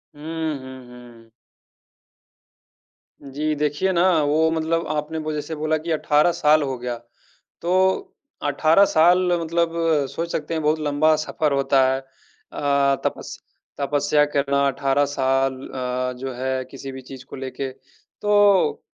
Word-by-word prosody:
हुँ, 160 0 -4
हुँ, 130 -1 -11
हुँ। 120 -2 -15 1.9
जी, 150 +3 -3
देखिए 150 +6 0
ना, 175 0 +3 0.2
वो 155 +2 +2
मतलब 165 +1 -1
आपने 155 +1 -3
वो 155 0 -4
जैसे 150 -1 -4
से 160 - -4
बोला 155 +1 0
कि 165 +2 -5
18 150 +2 +3
साल 150 -1 +3
हो 135 -2 -3
गया। 120 0 -4 0.7
तो 185 +2 +1 0.3
18 155 +6 +4
साल 175 +1 +4 0.2
मतलब 170 0 0 0.4
सोच 170 +1 -4
सकते 155 +2 -3
हैं, 160 - -2
बहुत 155 +1 +1
लंबा 150 +1 +2
सफर 155 -1 -1
होता 135 -1 +3
है। 135 - -1
अ, 140 +1 -2
तपस - - -4 0.4
तपस्या 145 +1 +2
करना 140 0 +2
18 140 +1 +1
साल 135 -1 +1 0.2
अ, 125 0 -2
जो 135 +1 -5
है, 130 +1 -2
किसी 135 0 -8
भी 130 - -8
चीज़ 130 0 -11
को - - -10
लेके। 135 +1 -5 0.5
तो 205 - +3
145 Hz, 140 wpm, -22 LUFS, 135-160 Hz, 1.9 s, 18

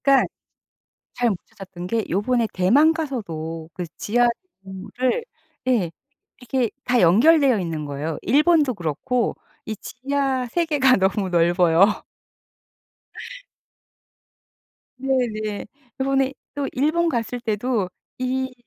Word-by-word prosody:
그러니까 275 -1 +4 0.9
잘 245 -1 +1
못 205 - 0
찾았던 185 -2 -9
게 225 +1 -1
요번에 230 +5 +1
대만 275 - +4
가서도 165 - -5
그 180 +1 -4
지하도를 240 - -1 0.4
예 215 -10 +2 0.5
이렇게 245 -1 -1 0.2
다 250 -1 +2
연결되어 255 - +5
있는 165 -4 -3
거예요. 145 +2 -4
일본도 295 - +3
그렇고 180 - -1 0.3
이 220 - -4
지하 265 +2 -2
세계가 285 -3 +3
너무 190 0 +1
넓어요. 175 +3 +3 3.0
네네. 235 -6 -1 0.3
저번에 270 0 +1 0.2
또 285 -1 -2
일본 310 +6 +1
갔을 245 -3 -2
때도 220 -3 -1 0.3
이 260 0 -1
240 Hz, 215 characters per minute, -22 LUFS, 190-265 Hz, 3.0 s, 연결되어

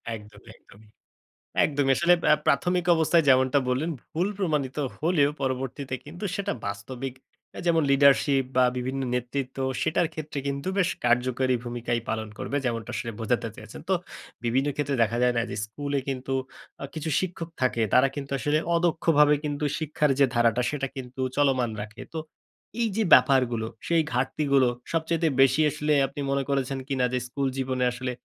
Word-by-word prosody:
একদমই, 105 0 -14
একদমই। 105 +1 -20 0.7
একদমই। 140 -2 +2
আসলে 170 +1 +5 0.2
আ - - +8
প্রাথমিক 175 +5 +2
অবস্থায় 160 +1 +3
যেমনটা 130 +1 +4
বললেন, 140 +7 0 0.2
ভুল 175 +5 0
প্রমাণিত 150 -8 -1 0.2
হলেও 155 -3 +3
পরবর্তীতে 130 0 -3
কিন্তু 175 +7 -7
সেটা 200 0 -2
বাস্তবিক 125 +6 -5 0.4
অ্যা - - -7
যেমন 165 -2 +3
leadership 140 0 +4
বা, 130 - +6
বিভিন্ন 130 +2 -2
নেতৃত্ব, 125 +2 -3 0.2
সেটার 160 +1 +1
ক্ষেত্রে 150 -2 -5
কিন্তু 140 +3 -3
বেশ 180 -2 +3 0.2
কার্যকরী 125 +1 +2
ভূমিকাই 120 -1 -2
পালন 110 -1 -2
করবে। 140 - -2
যেমনটা 115 -1 -2
আসলে 115 +3 -3
বোঝাতে 110 - 0
চেয়েছেন। - - -10
তো - - +4 0.5
বিভিন্ন 130 +4 +1
ক্ষেত্রে 145 -1 -1
দেখা 115 +1 -1
যায় 125 0 +3
না - - +3
যে, - - -4
স্কুলে 140 +5 -3
কিন্তু 135 0 -3 0.5
আ - - -2
কিছু 160 0 -4
শিক্ষক 170 -2 -4
থাকে। 125 -2 +1
তারা 125 +2 +6
কিন্তু 140 -1 -6
আসলে 150 +3 +1 0.2
অদক্ষভাবে 160 -3 +3
কিন্তু 145 0 -2
শিক্ষার 150 -2 +1
যে 140 - +7
ধারাটা 120 0 +3
সেটা 140 -2 -2
কিন্তু 130 0 -6 0.2
চলমান 130 -5 +2
রাখে। 110 +2 -9
তো 160 - -2 0.6
এইযে 220 -1 +1
ব্যাপারগুলো 120 -5 +4 0.2
সেই 170 -1 +3
ঘাটতিগুলো 135 +1 +2 0.3
সবচাইতে 165 0 +1
বেশি 135 +3 +5
আসলে 150 0 0
আপনি 140 +2 -7
মনে 140 0 +1
করেছেন 135 -1 -1
কিনা 130 -2 +1
যে 125 - +1
স্কুল 140 +2 -2
জীবনে 130 -1 -1
আসলে 125 +1 -4
135 Hz, 160 wpm, -26 LUFS, 125-150 Hz, 0.7 s, আ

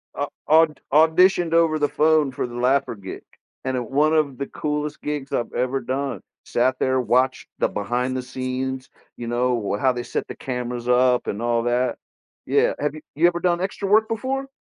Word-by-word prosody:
I - - -1
au - - -11 0.7
au 155 +2 +7
auditioned 180 -1 +3
over 165 -2 +4
the 145 -1 +1
phone 155 -3 +3
for 130 - -3
the 120 - -10
laugher 130 0 +1
gig, 95 -2 -9 0.4
and 130 -1 -1
one 150 +3 +3
of 145 -4 +1
the 140 - -4
coolest 150 0 -3
gigs 150 -2 -4
I've 120 - -1
ever 130 +2 -1
done, 135 -5 -3 0.2
sat 130 +2 +1
there, 130 0 +2
watched 130 +2 +1
the - - +3
behind 125 +5 -2
the - - -2
scenes, 130 +1 -4 0.3
you 120 - -6
know, 120 -4 0
how 130 - +4
they 120 0 -4
set - - -3
the - - -7
cameras 125 -1 -4
up 125 0 +3
and 105 - -3
all 120 0 +1
that. 120 +1 0 0.5
Yeah, - - +2
have 150 +1 -1
you 155 - -9
you 165 +3 +5
ever 175 0 0
done 175 -1 +1
extra 195 +1 -3
work 215 +2 +5
before? 265 +4 -2
130 Hz, 195 wpm, -23 LUFS, 125-155 Hz, 0.7 s, au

